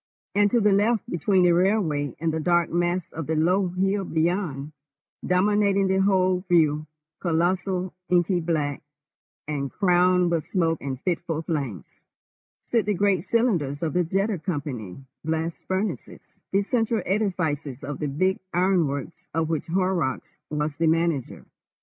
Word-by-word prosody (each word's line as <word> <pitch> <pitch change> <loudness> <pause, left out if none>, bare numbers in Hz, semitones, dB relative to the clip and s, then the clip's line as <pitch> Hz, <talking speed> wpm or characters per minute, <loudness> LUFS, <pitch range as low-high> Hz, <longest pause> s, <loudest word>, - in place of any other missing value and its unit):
And 205 0 +4
to 240 - +3
the 210 -2 +3
left, 210 +3 +2
between 185 +3 +2
the 175 - +5
railway 170 - +1
and 160 0 0
the 160 - -1
dark 175 +1 +2
mass 175 +1 0
of 165 -2 -6
the 160 - 0
low 180 +5 +2
hill 195 +3 0
beyond, 160 -4 -1 0.5
dominating 200 +1 +2
the 190 0 +2
whole 185 -2 +3
view, 155 -3 +3 0.3
colossal, 180 +2 0 0.2
inky 175 0 +3
black, 155 -4 -1 0.7
and 140 -2 -2
crowned 180 -2 +3
with 165 -3 -1
smoke 165 -4 0
and 130 -2 -4
fitful 170 -3 -2
flames, 140 - -4 0.7
stood 230 -3 +1
the 210 - +1
great 195 -1 +1
cylinders 175 - +1
of 160 - -1
the 180 0 +2
Jeddah 195 +3 0
Company 135 - -5 0.2
Blast 160 +1 -3
Furnaces, 190 +3 -4 0.2
the 195 +1 +2
central 225 -2 0
edifices 165 - -1
of 140 +1 -5
the 150 - -1
big 185 +7 0 0.2
ironworks 175 -5 0
of 160 -1 0
which 160 0 -2
Horrocks 180 -6 -1
was 150 -1 -2
the 165 0 +2
manager. 165 -4 0
175 Hz, 145 wpm, -25 LUFS, 155-190 Hz, 0.7 s, the